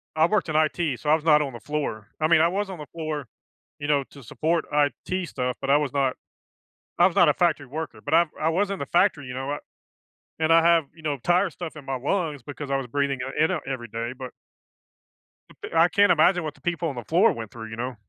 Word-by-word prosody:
I 160 0 +5
worked 205 -4 0
in 155 - -2
IT, 155 -3 +1
so 150 - -3
I - - +7
was 160 - -4
not 150 -2 +5
on 135 - -5
the 120 - -8
floor, 140 -8 -4
I 155 - +2
mean, 160 -1 +5
I 165 - +5
was 195 +3 -2
on 185 -4 -7
the 150 - -7
floor, 155 -4 -4 0.5
you 145 - -4
know, 145 -2 +2
to 140 -3 -13
support 160 +8 -1
IT 150 +5 0
stuff, 125 0 -3
but - - -3
I 140 - +6
was 145 -2 -2
not 135 -2 +1 0.8
I 175 - +7
was 185 - 0
not 175 - +6
a - - +4
factory 165 -6 +1
worker, 145 -5 -6
but - - -1
I 170 +1 +6
I 155 - +2
was 190 +5 +1
in 195 - -3
the 140 - -4
factory, 170 -5 +2
you 125 - -6
know, 135 +2 -4
I 145 - -3 0.8
and 160 0 +2
I 165 0 +6
have, 170 -1 +4
you 160 - -16
know, 150 -2 -1
tire 180 +2 +2
stuff 165 0 -8
in 150 - -10
my 135 0 -3
lungs 145 0 -2
because 145 0 -7
I 135 - +2
was 135 -2 -3
breathing 140 0 -1
it 135 +4 0
in, 160 - +1
uh, 175 - -1
every 125 -3 -4
day, 115 +2 -4
but 130 -1 -6 1.5
I 165 +2 +6
can't 200 +1 +4
imagine 175 +2 +4
what 155 -1 -5
the - - -22
people 170 -1 -1
on 140 - -6
the 120 - -6
floor 165 - +4
went 115 -2 -7
through, 110 -1 -8
you 110 - -7
know? 125 +2 -4
150 Hz, 255 wpm, -25 LUFS, 135-170 Hz, 1.5 s, I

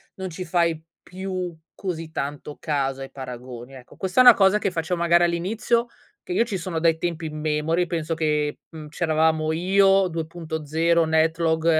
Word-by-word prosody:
non 190 -1 -5
ci 180 +2 -6
fai 170 -2 +1 0.2
più 185 -1 -5 0.2
così 165 -4 -5
tanto 145 0 -5
caso 135 -3 -1
ai 135 - -8
paragoni. 125 -1 -9
Ecco, 130 -2 -14
questa 190 +6 +2
è - - +7
una 245 -2 +10
cosa 195 -1 +4
che 200 -3 -1
faccio 170 +1 -2
magari 170 0 +4
all'inizio, 220 +7 0 0.4
che 365 - -9
io 235 -10 +2
ci 210 -5 -4
sono 170 -2 -3
dai 165 -1 +3
tempi 165 -1 -3
immemori, 155 +3 -1
penso 165 -1 -2
che, 150 -2 -1
mhmm, 155 -2 -9
c'eravamo 155 0 +1
io, 195 +3 +3
2.0, 165 0 -1
Netlog 160 0 +1
165 Hz, 165 wpm, -24 LUFS, 155-180 Hz, 0.4 s, una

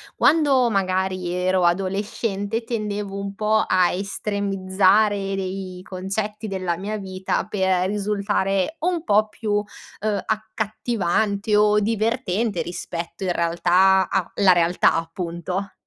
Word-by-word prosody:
Quando 280 -6 +4
magari 185 -2 0
ero 180 +1 +1
adolescente 200 +4 -1
tendevo 210 -3 -3
un 200 0 -5
po' 215 +1 +2
a 180 -1 +3
estremizzare 195 +1 +1
dei 185 -1 -5
concetti 205 +4 -4
della 185 -3 -2
mia 205 +5 -4
vita 190 -2 -3
per 190 -3 +1
risultare 200 - -1
un 345 -1 -1
po' 215 -2 +3
più, 210 -1 -1 0.4
ehm, 210 -1 -1
accattivante 215 -1 -1
o 210 0 +4
divertente 220 -2 0
rispetto 175 +1 -6
in 180 - +1
realtà 180 +3 +3
a - - -1
la 195 -3 +6
realtà 175 0 +3
appunto. 175 +3 -4
195 Hz, 115 wpm, -22 LUFS, 185-215 Hz, 0.4 s, la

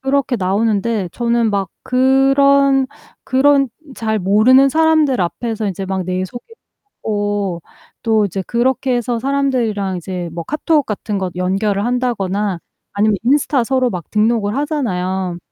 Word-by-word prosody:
그렇게 270 -1 0
나오는데 205 +1 0
저는 235 -1 +1
막 200 -2 -1 0.2
그런 270 +1 +3 0.4
그런 275 +1 +3 0.3
잘 220 -2 -1
모르는 215 +8 +5
사람들 315 -4 +2
앞에서 220 +4 -2
이제 195 0 -4
막 190 0 -2
내 185 +1 -2
소개하고 205 - -5 0.4
또 220 -2 +2
이제 195 0 -3
그렇게 255 +1 0
해서 240 0 -2
사람들이랑 240 -7 -1
이제 175 0 -5
뭐 170 0 -5
카톡 300 +1 +1
같은 210 -1 -3
거 190 -1 -2
연결을 195 +2 0
한다거나 210 -6 -1 0.4
아니면 210 0 +2
인스타 270 0 +2
서로 255 0 +1
막 175 -4 -7
등록을 215 0 +1
하잖아요. 190 - -2
225 Hz, 295 characters per minute, -17 LUFS, 195-265 Hz, 0.4 s, 모르는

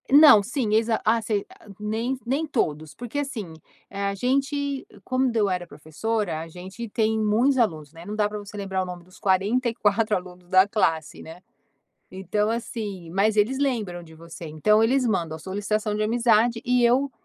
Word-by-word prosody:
Não, 285 -6 +8
sim, 235 -1 -2
exa 225 0 +2
ah 225 +2 +3
sei 210 -2 -1 0.3
nem 225 +5 -2
nem 275 +6 0
todos, 155 - -2
porque 245 +4 -5
assim, 225 - -5 0.4
eh, 200 0 -5
a 200 - 0
gente 275 +4 -1 0.2
quando 255 -2 0
eu 210 -3 +2
era 180 -1 -2
professora, 170 +3 -3
a 165 - -7
gente 190 +7 -8
tem 220 +1 +1
muitos 225 +6 +2
alunos, 160 - 0
né, 165 +1 -12
não 210 - -5
dá 210 -1 +2
para 210 0 -6
você 205 0 -10
lembrar 195 -2 -2
o - - -2
nome 180 -1 -8
dos 185 +1 -19
44 215 +2 +1
alunos 180 -1 -8
da 185 +1 +5
classe, 165 -7 0
né, 165 +3 -11 0.7
então, 195 +3 -1
assim, 210 -6 -4
mas 205 +4 +2
eles 220 +6 +2
lembram 220 -11 -1
de 160 -1 -15
você, 165 +1 -10
então 210 +8 +3
eles 255 +3 +2
mandam 170 -8 -1
a - - -10
solicitação 205 +4 -2
de 215 - 0
amizade 230 0 +2
e 250 0 +3
eu 260 +4 +3
210 Hz, 180 wpm, -24 LUFS, 185-235 Hz, 0.7 s, Não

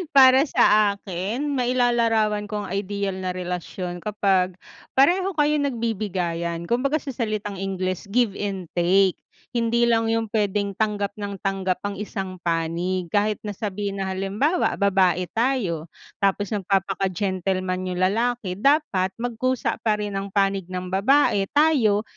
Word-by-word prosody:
Para 260 -1 +8
sa 210 -7 +4
akin? 205 +10 -3
Mailalarawan 235 -4 +2
ko 210 -1 -3
ang - - -8
ideal 200 0 -2
na 185 - -2
relasyon 180 0 -4
kapag 195 -3 +1 0.4
pareho 365 +8 +4
kayong 295 -1 +2
nagbibigayan. 180 -8 -2
Kumbaga 270 +5 +1
sa 285 - -7
salitang 215 -4 -3
Ingles 185 -1 -3
give 240 -4 +3
and 195 -3 -3
take. 185 +2 +3 0.4
Hindi 235 0 +2
lang 225 -1 +2
yung 225 0 0
pwedeng 205 -1 0
tanggap 205 -2 -1
ng 200 -2 -5
tanggap 190 -2 -1
ang 200 - -5
isang 190 -2 -5
panig 170 +2 -1
kahit 210 +3 +1
na 205 - -3
sabihin 200 -1 -3
na - - -1
halimbawa 205 - 0
babae 185 -3 +3
tayo, 220 - 0 0.3
tapos 200 0 +1
magpapaka 195 -1 0
gentleman 185 0 -2
yung 180 - -3
lalaki 215 0 0
dapat 275 -9 +2
magkusa 245 +2 -1
pa 215 -2 +2
rin 205 -1 -4
ang 195 +1 -5
panig 195 -2 +1
ng 185 0 -4
babae 200 0 +3
tayo, 260 -10 +4
200 Hz, 140 wpm, -23 LUFS, 185-230 Hz, 0.4 s, Para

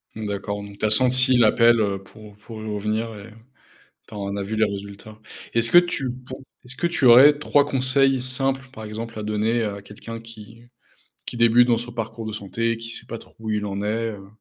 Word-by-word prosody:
Mmh 110 -1 -5
d'accord. 100 0 -4
Donc 100 0 -11
tu - - -2
as - - +2
senti 130 +3 +4
l'appel, 115 0 +5
heu, 100 -2 -1
pour 105 +1 -15
pour 110 0 -10
y - - -8
revenir, 110 +2 -2
et 110 +2 -12 0.7
tu - - -14
en 100 -1 -4
as 100 - -3
vu 110 +3 -4
les 110 0 +3
résultats. 100 +1 -8 0.4
Est-ce 115 0 +1
que 175 - +6
tu 170 -8 +2 0.2
pour 130 +1 -8 0.2
est-ce 125 +1 -1
que 175 - 0
tu 165 -6 -1
aurais 135 +5 +8
3 145 -1 +2
conseils 135 -1 +2
simples, 135 +1 -1
par 110 - -9
exemple, 110 +1 -7
à 105 - -5
donner, 110 +2 0
à 100 -1 -4
quelqu'un 115 +3 -9
qui 115 0 -12 0.6
qui 120 - -5
débute 115 +1 +5
dans 115 -2 +3
son 120 0 -6
parcours 115 -1 -5
de 110 - -5
santé, 115 +3 -2
qui 115 0 -8
sait - - -7
pas 115 - -6
trop - - -18
où 110 -1 -6
il 105 -1 -1
en 100 0 -4
est, 110 +2 -2
heu? 100 -2 -11
115 Hz, 220 wpm, -23 LUFS, 105-120 Hz, 0.7 s, aurais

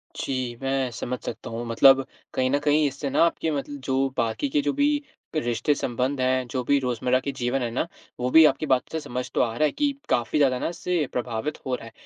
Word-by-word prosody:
जी, 130 -3 -3
मैं 135 -1 0
समझ 125 +2 -4
सकता - - -6
हूँ। 115 +1 -4
मतलब 135 +3 +6 0.3
कहीं 130 0 +1
न 145 - +2
कहीं 150 +1 +3
इससे 140 +1 -4
ना 140 +4 +3
आपके 165 -1 -1
मतल 145 0 -4
जो 135 0 +1
बाकी 115 +3 0
के 145 - +2
जो 145 0 0
भी 290 0 +2 0.3
रिश्ते-संबंध 130 0 0
हैं, 130 0 +1
जो 125 +1 -3
भी 140 +3 +3
रोज़मर्रा 125 0 +1
के 140 +1 -3
जीवन 130 0 -1
हैं 120 - -1
ना? 130 +8 -1 0.3
वो 125 +1 0
भी 160 0 +9
आपकी 145 +1 +2
बात 130 -3 +2
से 160 - -2
समझ 125 -3 -5
तो - - +2
आ 120 - +2
रहा 155 - +3
है 150 - +1
कि 290 - +1 0.2
काफ़ी 120 +5 +1
ज़्यादा 130 -3 +3
ना - - -1
इससे 170 -2 -1
प्रभावित 120 +4 -3
हो 130 -1 0
रहा 115 - -9
है। 115 - -11
135 Hz, 230 wpm, -25 LUFS, 125-145 Hz, 0.3 s, भी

